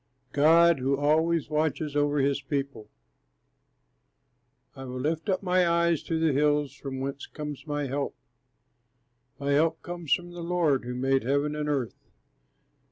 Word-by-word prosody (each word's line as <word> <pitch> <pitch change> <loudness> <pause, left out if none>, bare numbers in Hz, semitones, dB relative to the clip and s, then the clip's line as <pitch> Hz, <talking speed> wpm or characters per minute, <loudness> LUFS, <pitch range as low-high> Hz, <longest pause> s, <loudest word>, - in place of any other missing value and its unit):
GOD 165 +2 +5
WHO 135 +2 +1
ALWAYS 155 +2 +1
WATCHES 150 -1 -1
OVER 145 0 +2
HIS 140 0 +1
PEOPLE 135 -6 -4 1.9
I 135 -1 -8
will 125 0 -6
lift 160 - -2
up 190 0 0
my 180 -1 +3
eyes 170 -2 +2
to 160 0 -2
the 160 -2 +2
hills; 145 0 +1
from 135 -2 -6
whence 135 +1 -5
comes 150 0 -7
my 145 -1 -2
help? 140 +1 -3 1.2
My 140 0 -2
help 160 +3 +2
comes 175 -4 -7
from 175 0 +1
the 175 0 -8
Lord, 165 -7 +1
who 125 0 -4
made 135 +1 +1
heaven 140 +4 0
and 150 0 -2
earth. 135 -6 -2
145 Hz, 150 wpm, -27 LUFS, 140-165 Hz, 1.9 s, GOD